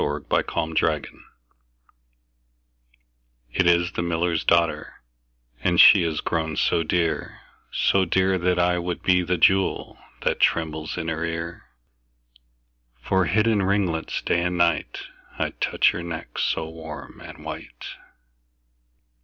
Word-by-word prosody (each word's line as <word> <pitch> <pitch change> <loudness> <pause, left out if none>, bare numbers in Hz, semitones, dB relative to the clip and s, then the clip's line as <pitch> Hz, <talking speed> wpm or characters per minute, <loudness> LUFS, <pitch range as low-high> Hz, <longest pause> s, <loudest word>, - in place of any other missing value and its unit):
The 75 0 -2
Miller's - - +3 0.4
Daughter 75 -2 -2 2.3
IT 90 +7 +1
is 85 +1 +3
the - - -3
miller's 85 -1 -1
daughter, 85 -6 0 0.6
And 85 -2 +2
she 100 - +9
is 80 -3 -1
grown 80 -1 -2
so - - +2
dear, 85 0 -2 0.3
so 95 - +2
dear, 95 +1 +1
That 90 +1 +1
I 90 0 +2
would 90 0 -4
be 90 -1 +3
the 90 0 -1
jewel 95 +3 +1 0.2
That - - 0
trembles 80 -1 0
in 85 -2 -4
her 80 0 -2
ear: 85 0 -5 1.3
For 95 +8 +1
hid 105 +4 +2
in 110 -3 +2
ringlets 95 -4 -1
day 85 - +1
and 90 0 -1
night, 85 0 0 0.4
5 - - -5
I'd - - -3
touch - - +3
her 85 - -5
neck 85 -2 -6
so 80 - -1
warm 80 -2 -10
and - - -12
white. - - -8
85 Hz, 135 wpm, -24 LUFS, 80-90 Hz, 2.3 s, she